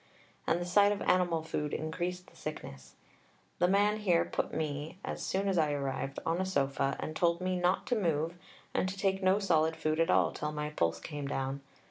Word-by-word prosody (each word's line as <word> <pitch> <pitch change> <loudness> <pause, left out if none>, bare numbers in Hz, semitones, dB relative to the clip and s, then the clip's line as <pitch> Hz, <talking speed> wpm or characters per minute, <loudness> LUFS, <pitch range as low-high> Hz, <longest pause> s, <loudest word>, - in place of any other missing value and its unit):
And 170 - +2
the 175 - -3
sight 200 +3 +5
of 205 - -1
animal 175 -3 +2
food 150 -2 -2
increased 180 +3 -3
the - - -20
sickness. 70 - -8 0.6
The 180 - +4
man 205 +3 +3
here 185 -6 +2
put - - -2
me, 155 +2 -3
as - - -4
soon 195 +1 0
as 190 -3 +2
I 150 -2 +2
arrived, 135 -1 -3
on 170 +3 +1
a - - 0
sofa 140 -5 0
and 155 - -4
told 170 0 +2
me 185 0 -1
not 180 +1 +1
to 250 - +1
move 165 -5 0 0.4
and 185 - +1
to 190 - -6
take 195 -1 +1
no 190 +1 +4
solid 160 -5 +2
food 155 0 -1
at 165 - +3
all - - +4
till 150 0 -3
my 150 0 -3
pulse 85 - 0
came 145 - -5
down. 135 0 -2
165 Hz, 205 wpm, -32 LUFS, 150-185 Hz, 0.6 s, sight